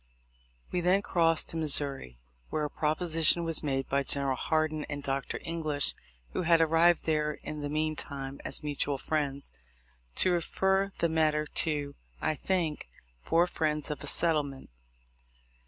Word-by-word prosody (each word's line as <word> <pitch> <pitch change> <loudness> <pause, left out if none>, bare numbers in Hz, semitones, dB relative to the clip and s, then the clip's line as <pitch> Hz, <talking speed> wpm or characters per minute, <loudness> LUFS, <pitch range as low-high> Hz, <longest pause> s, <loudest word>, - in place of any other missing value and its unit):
We 180 - -1
then 185 +3 +2
crossed 165 -4 +2
to 165 - -1
Missouri, 140 - +1 0.3
where 155 - -2
a 145 - -6
proposition 165 +2 +3
was 165 -2 +2
made 135 -3 -2
by 140 +1 0
General 140 -1 0
Hardin 155 +1 -1
and 145 -1 -5
Dr. 135 0 -3
English 155 -4 +3 0.4
(who - - -1
had 165 -1 +3
arrived 165 +1 +3
there 150 -1 0
in 150 -1 -6
the 145 - -4
mean 155 +1 -1
time 140 -2 -6
as - - -1
mutual 145 -1 -2
friends) 140 -1 -3 0.6
to 185 - +5
refer 190 +3 0
the 170 - +1
matter 155 -1 +1
to, 145 -2 -1 0.3
I - - 0
think, 160 - -2 0.3
four 170 - +2
friends 155 -4 -2
for 150 - -2
a 145 - -6
settlement. 145 - +1
155 Hz, 150 wpm, -29 LUFS, 145-165 Hz, 0.6 s, to